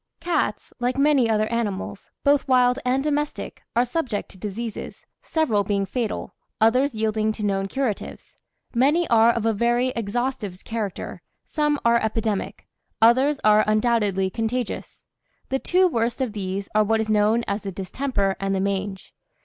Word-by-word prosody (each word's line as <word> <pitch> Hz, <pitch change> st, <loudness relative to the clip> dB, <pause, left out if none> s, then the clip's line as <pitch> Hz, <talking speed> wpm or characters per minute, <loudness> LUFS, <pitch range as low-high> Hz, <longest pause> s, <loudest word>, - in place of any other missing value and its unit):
Cats, 350 Hz, -, -1 dB
like 245 Hz, +2 st, 0 dB
many 275 Hz, -4 st, +4 dB
other 215 Hz, -1 st, +2 dB
animals, 205 Hz, -4 st, -3 dB
both 285 Hz, 0 st, +3 dB
wild 250 Hz, 0 st, +4 dB
and 255 Hz, +2 st, +1 dB
domestic, 295 Hz, 0 st, -2 dB
are 240 Hz, +1 st, +4 dB
subject 245 Hz, -5 st, -2 dB
to -, -, -14 dB
diseases, 215 Hz, +3 st, -6 dB, 0.2 s
several 260 Hz, -11 st, +1 dB
being 200 Hz, 0 st, 0 dB
fatal, 225 Hz, +2 st, -3 dB, 0.3 s
others 250 Hz, +4 st, +3 dB
yielding 215 Hz, 0 st, 0 dB
to 215 Hz, -1 st, -4 dB
known 195 Hz, -1 st, 0 dB
curatives; 250 Hz, -2 st, -4 dB, 0.4 s
many 290 Hz, +8 st, +3 dB
are 230 Hz, 0 st, +6 dB
of 230 Hz, -1 st, -2 dB
a 225 Hz, -, +3 dB
very 240 Hz, +4 st, +1 dB
exhaustive 230 Hz, -3 st, -3 dB
character, 220 Hz, -4 st, -4 dB, 0.2 s
some 295 Hz, -2 st, 0 dB
are 235 Hz, 0 st, +4 dB
epidemic, 220 Hz, -2 st, -2 dB, 0.3 s
others 260 Hz, +6 st, +4 dB
are 215 Hz, 0 st, +5 dB
undoubtedly 215 Hz, -4 st, +1 dB
contagious 230 Hz, +2 st, -3 dB, 0.5 s
the 265 Hz, -, 0 dB
two 370 Hz, +5 st, +3 dB
worst 235 Hz, -5 st, -1 dB
of 255 Hz, -5 st, -1 dB
these 195 Hz, -1 st, -3 dB
are 215 Hz, 0 st, +4 dB
what 220 Hz, +1 st, +1 dB
is 220 Hz, -, -1 dB
known 215 Hz, +2 st, +3 dB
as 200 Hz, +1 st, -2 dB
the 195 Hz, -, -5 dB
distemper 195 Hz, +1 st, -1 dB
and 195 Hz, 0 st, -1 dB
the -, -, 0 dB
mange. 195 Hz, 0 st, -3 dB
225 Hz, 155 wpm, -23 LUFS, 205-255 Hz, 0.5 s, are